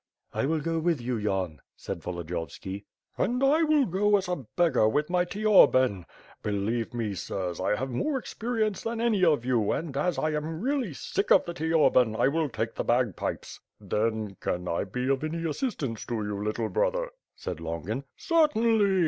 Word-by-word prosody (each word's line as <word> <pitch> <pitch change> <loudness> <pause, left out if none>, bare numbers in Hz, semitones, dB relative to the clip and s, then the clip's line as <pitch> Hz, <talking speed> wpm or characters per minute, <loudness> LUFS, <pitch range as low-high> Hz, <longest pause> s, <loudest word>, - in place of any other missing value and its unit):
"I 135 - 0
will 160 0 0
go 165 +2 -1
with 165 -2 +1
you 120 +1 -2
Yan," 95 -6 -2 0.2
said 85 - -5
Volodiyovski. 90 +3 -5 0.3
"And 250 +6 +1
I 295 +4 +4
will 305 -3 +4
go 205 +2 +3
as 190 -2 -3
a 175 -10 -3
beggar 165 -11 +4
with 150 +7 0
my 180 0 +2
teorbane. 130 - +4 0.4
Believe 105 +3 -1
me, 115 -4 -2
sirs, 90 -1 -4
I 95 +3 +1
have 130 +4 -3
more 270 - 0
experience 225 -4 -2
than 230 0 -3
any 225 -5 +2
of 150 -8 +3
you 120 -5 +2
and 155 -4 -3
as 165 +5 0
I 155 - 0
am 155 +1 -3
really 255 - -1
sick 200 - -2
of 190 - +6
the 170 - -4
teorbane, 150 -8 +3
I - - +4
will 155 0 0
take 115 -1 -3
the - - -3
bagpipes." 120 -4 -1 0.2
"Then, 110 -2 -1
can 90 0 -2
I 85 - -1
be 125 +6 -3
of 135 +1 +1
any 165 +1 -2
assistance 150 - -3
to 120 - -2
you, 105 -2 -3
little 110 +1 -1
brother?" - - 0 0.2
said 90 -3 -5
Longin. 85 - -4
"Certainly!" 225 - +3
145 Hz, 180 wpm, -28 LUFS, -, 0.4 s, of